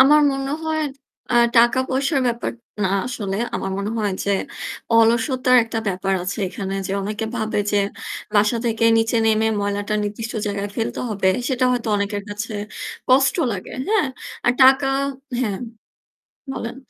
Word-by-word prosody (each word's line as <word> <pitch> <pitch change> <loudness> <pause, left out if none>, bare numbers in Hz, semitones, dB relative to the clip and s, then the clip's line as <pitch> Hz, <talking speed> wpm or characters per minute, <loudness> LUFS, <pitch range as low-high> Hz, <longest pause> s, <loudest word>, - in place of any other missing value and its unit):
আমার 295 +3 +7
মনে 270 0 -3
হয় 315 0 0 0.5
আ - - +2 0.2
টাকা-পয়সার 260 +4 +3
ব্যাপার 235 0 -1 0.3
না 190 - +2 0.2
আসলে। 205 -6 -3 0.2
আমার 195 - -2
মনে 200 +1 -2
হয় 210 -2 0
যে 200 - 0 0.6
অলসতার 235 +3 +4
একটা 225 0 -3
ব্যাপার 195 +1 0
আছে 185 +4 -4
এখানে। 195 +1 -4
যে 195 - -3
অনেকে 210 +2 -3
ভাবে 220 -2 -1
যে - - +3 0.6
বাসা 210 +3 +4
থেকে 230 -1 +1
নিচে 225 +1 +1
নেমে 220 0 +3
ময়লাটা 205 +1 -1
নির্দিষ্ট 220 +3 -4
জায়গায় 200 0 -2
ফেলতে 225 - -2
হবে 195 -2 +1 0.2
সেটা 255 -2 +1
হয়তো 240 -2 -1
অনেকের 205 0 -2
কাছে 210 +2 -5 0.6
কষ্ট 265 +1 +4 0.2
লাগে, 190 -2 -6 0.2
হ্যাঁ। 430 -8 +3 0.4
আর 240 - +5
টাকা 265 +1 +7 0.5
হ্যাঁম 215 -4 -1 0.9
বলেন। 235 -1 -5
225 Hz, 145 wpm, -21 LUFS, 205-255 Hz, 0.9 s, আমার